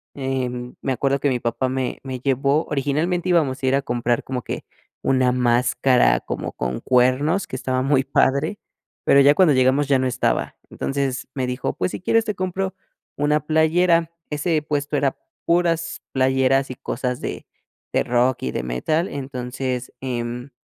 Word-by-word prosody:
em, 125 -2 -3
me 135 - -1
acuerdo 140 +1 0
que 145 - +2
mi 125 -2 0
papá 120 +3 -1
me 130 -1 -2
me 130 -2 -5
llevó 140 +3 +1
originalmente 155 +6 0
íbamos 140 -7 +1
a - - +2
ir 135 - +3
a 140 - +1
comprar 120 -2 0
como 130 -2 -3
que - - -5 0.4
una 130 -1 +3
máscara 125 +1 +3
como - - -5
con 65 0 -3
cuernos, 130 +8 +2
que - - -6
estaba 130 0 -1
muy 135 -1 +3
padre, 140 +6 +1 0.5
pero 140 - +6
ya 145 +1 +6
cuando 180 -6 +5
llegamos 130 +2 +3
ya 135 -2 +3
no 130 - +1
estaba. 125 0 -1
Entonces, 135 -1 -2
me 130 -2 -1
dijo: 125 0 -2
"Pues, 185 - -2
si - - -6
quieres, 225 +3 +2
te 210 -3 -2
compro 185 +1 -2 0.4
una 150 +1 +2
playera". 165 +1 +3 0.2
Ese 155 +1 0
puesto 145 -1 -1
era 140 -1 0 0.3
puras 170 -1 +1
playeras, 130 0 +2
y - - -6
cosas 125 0 -3
de - - -5 0.5
de - - +2
rock, 125 +1 +1
y 65 - -1
de - - -3
metal. 155 - 0
Entonces, 130 -2 -4
em, 125 0 -4
135 Hz, 170 wpm, -22 LUFS, 125-150 Hz, 0.5 s, pero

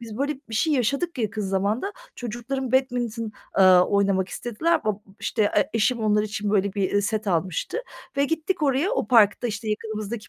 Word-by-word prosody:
Biz 225 -2 -8
böyle 285 +2 0
bir 225 - -6
şey 310 +8 +2
yaşadık 280 +5 0
yakın 215 -2 -2
zamanda, 200 - -1 0.2
çocuklarım 245 +2 -4
badminton, 240 -4 0 0.2
aaa, 185 -2 +7
oynamak 195 -2 +1
istediler. 245 +9 -2
Ab - - 0
ıb 210 - +1 0.2
işte, 220 - 0
e 205 - +2
eşim 230 +2 +1
onlar 210 -1 +2
için, 210 -1 -3
böyle, 200 -1 +1
bir, 195 -3 -1
eee, 205 - +2
set 215 +1 -2
almıştı 180 - -1 0.4
ve 280 - +3
gittik 325 +2 -2
oraya, 285 +6 +2
o - - -1
parkta, 225 -2 +4
işte, 220 0 -4
yakınımızdaki 215 0 -4
220 Hz, 180 wpm, -24 LUFS, 205-260 Hz, 0.4 s, aaa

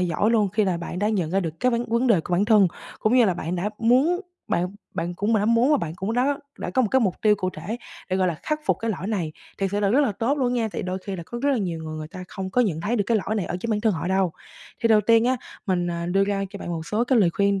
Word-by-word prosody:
giỏi 180 +5 +1
luôn 215 -4 +3
khi 210 +2 +1
là 185 -3 0
bạn 170 +1 -5
đã 210 +2 +1
nhận 180 -7 0
ra 195 +1 +2
được 165 -2 -5
cái 250 - +3
vấn 235 0 0
vấn 235 +3 +1
đề 205 -9 +4
của 180 - -7
bản 180 +3 +3
thân, 210 -3 +5 0.3
cũng 215 +3 +2
như 245 - +6
là 185 -4 +2
bạn 175 +1 -3
đã 200 +4 -1
muốn 265 - +3 0.3
bạn 175 +1 +1 0.3
bạn 175 +1 -2
cũng 210 +5 0
đã 205 - +2
muốn 230 +5 +3
và 295 - +5
bạn 160 - -3
cũng 195 +5 -2
đã 275 +4 +1 0.2
đã - - -4
có 260 - +2
một 225 - +1
cái 265 - +4
mục 195 -7 +1
tiêu 210 -1 +5
cụ 185 -1 -2
thể 185 +8 -5 0.3
để, 185 - +2
gọi 185 -1 +2
là, 170 - -1
khắc 305 0 -1
phục - - +2
cái 225 0 -1
lỗi 185 -1 -4
này. 180 -8 -2 0.3
Thiệt 195 -1 0
sự 205 - 0
là 200 - +2
rất 265 - +4
là 265 -8 +2
tốt 250 +8 0
luôn 250 -2 +1
nha, 230 -3 0
tại - - -3
đôi 185 +1 -3
khi 190 0 -6
là 170 - -6
có 240 - -6
rất 285 - +3
là 270 - +2
nhiều 175 -5 -2
người, 155 0 -5
người 155 0 -6
ta 185 0 -8
không 190 -2 -5
có 250 - +2
nhận 175 -9 0
thấy 230 +7 0
được 205 - +1
cái 230 - +3
lỗi 215 - 0
này 200 -5 -1
ở 180 - -3
chính 230 - -3
bản 210 -1 +1
thân 220 -2 +2
họ 175 +1 -3
đâu. 190 -2 +1 0.5
Thì 230 - +2
đầu 220 -1 +6
tiên 230 +2 +4
á, 255 +1 +2 0.3
mình, 180 -2 +1
à, 170 0 -3
đưa 195 +2 +2
ra 200 -1 -1
cho 200 - -8
bạn - - -7
một 165 -2 -4
số 220 +3 0
cái 250 -1 +3
lời 180 -5 +4
khuyên 200 +1 +1
205 Hz, 325 wpm, -24 LUFS, 180-230 Hz, 0.5 s, như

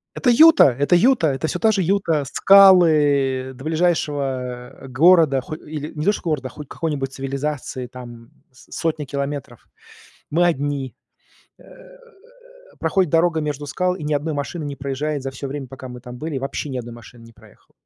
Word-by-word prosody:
Это 250 - +1
Юта! 325 +7 +7
Это 140 +6 +2
Юта! 210 - +3
Это 135 +3 -2
всё 180 - -3
та 220 +2 +3
же 195 -2 0
Юта. 165 -5 0
Скалы, 190 +1 +6 0.6
э, - - -9
до 130 - -12
ближайшего, 160 -3 0
а, 125 0 -6
города, 155 0 +4
ху 155 - -7
или, 150 -1 -7
не 150 +1 -4
то 205 - +3
что - - -6
города, 150 -6 -2
хоть 150 +1 -11
какой-нибудь 140 -5 -4
цивилизации, 135 -1 -4
там 120 -2 -12 0.2
с 125 - -20
сотни 160 -2 -2
километров, 140 0 -5 0.6
мы 170 +4 +2
одни. 140 -4 -2 0.6
Э, - - -20 1.2
проходит 175 +1 0
дорога 165 -1 +2
между 145 -1 -4
скал, 180 +5 -1
и 155 - -8
ни 150 - -2
1 150 +2 -1
машины 150 +3 -4
не 140 -1 -6
проезжает 140 +1 -3
за 135 - -4
всё 135 +1 -7
время, 140 -1 -6
пока 130 0 -10
мы 125 0 -9
там 125 0 -10
были, 155 -2 -5
вообще 135 +2 -5
ни 130 - -5
1 120 -1 -8
машины 120 0 -15
не 115 - -16
проехало. - - -22
145 Hz, 180 wpm, -21 LUFS, 135-165 Hz, 1.2 s, Юта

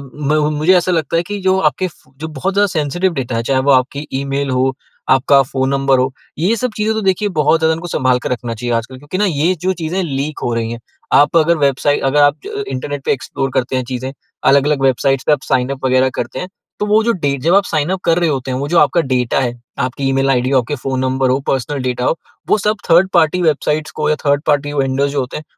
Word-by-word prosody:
म 150 +1 0 0.2
मुझे 165 +5 +4
ऐसा 180 +1 0
लगता 165 -1 0
है 170 - +1
कि 205 0 -4
जो 190 0 +2
आपके 170 +7 -1
फू 130 -5 -18 0.2
बहुत 155 +6 -3
ज़्यादा 205 0 +3
सेंसिटिव 175 +2 -1
डाटा 130 -5 -3
हैं, 115 - -1
चाहे 130 +1 +1
वो 140 +1 +2
आपकी 135 +3 +1
ई-मेल 140 +1 -2
हो, 130 +1 +1 0.4
आपका 135 +1 +5
फ़ोन 130 0 -2
नंबर 135 -1 +2
हो, 130 +1 0 0.3
ये 195 +8 +2
सब 250 0 -2
चीज़ें 215 +1 0
तो 220 - -1
देखिए 195 +2 +1
बहुत 155 +2 +3
ज़्यादा 160 0 +2
इनको 165 +2 -6
संभाल 130 -6 +1
कर - - -3
रखना 120 -1 -3
चाहिए 120 +2 -3
आजकल। 115 +3 -4
क्योंकि 145 +7 -6
ना, 210 - +3
ये 170 +1 +1
जो 185 +1 +1
चीज़ें 175 +2 -3
लीक 145 0 -3
हो 120 - -1
रही 115 0 -2
हैं। 120 - -6 0.3
आप 145 +3 +5
अगर 165 +1 +3
वेबसाइ 145 0 +1
अगर 135 +2 +2
आप 145 - +2 0.2
इंटरनेट 140 +2 -4
पे - - +2
एक्सप्लोर 135 0 -4
करते 130 +1 0
हैं, 130 - -1
चीज़ें 130 +1 -4 0.4
अलग-अलग 140 0 +2
वेबसाइट्स 135 0 +2
पे - - +5
आप 140 - -1
साइन 125 0 0
अप 135 -1 -4
वगैरह 130 0 +3
करते - - -4
हैं, 180 - -5 0.3
तो 210 - 0
वो 210 +1 +3
डे 145 -8 -1
जब 165 +8 +2
आप 200 - +4
साइन 155 +1 0
अप 190 -1 -2
कर 165 +1 +3
रहे 170 -2 +1
होते 130 -2 -2
हैं, 125 - -2
वो 140 - -3
जो 170 0 +4
आपका 170 - +3
डाटा 125 0 +1
है, 120 -2 -1 0.3
आपकी 130 +1 -2
ई-मेल 135 0 +1
आईडी 125 0 +1
हो, 130 - +4
आपके 125 +5 -3
फ़ोन 130 -1 -1
नंबर 130 0 0
हों, 135 +1 0
पर्सनल 135 +1 -2
डाटा 125 0 -2
हो, 165 - +1 0.3
वो - - +4
सब 210 +1 0
थर्ड-पार्टी 175 0 +4
वेबसाइट्स 155 -1 0
को 150 0 +1
या 155 - +2
थर्ड-पार्टी 145 0 +1
वेंडर्स 140 0 0
जो 145 - -1
होते 130 +2 -4
हैं, 155 - -8
140 Hz, 240 wpm, -16 LUFS, 130-165 Hz, 0.4 s, आपका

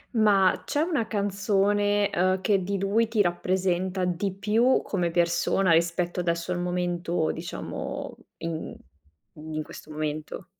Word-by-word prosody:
Ma 200 -4 +4
c'è 290 - 0
una 305 -9 0
canzone, 205 0 +1
ehm, 185 +1 +1
che 195 -1 +2
di 200 +2 -1
lui 205 +4 +2
ti 220 -2 +2
rappresenta 185 +1 0
di 180 +2 -1
più 220 +6 +2
come 180 -4 -1
persona, 170 +2 +2
rispetto 170 +2 +1
adesso 170 0 -1
al 175 - -1
momento, 175 -2 -1
diciamo, 170 +1 -6 0.2
in 165 -1 -4 0.6
in 155 0 -5
questo 150 - -12
momento. 155 +3 -4
185 Hz, 130 wpm, -26 LUFS, 170-200 Hz, 0.6 s, Ma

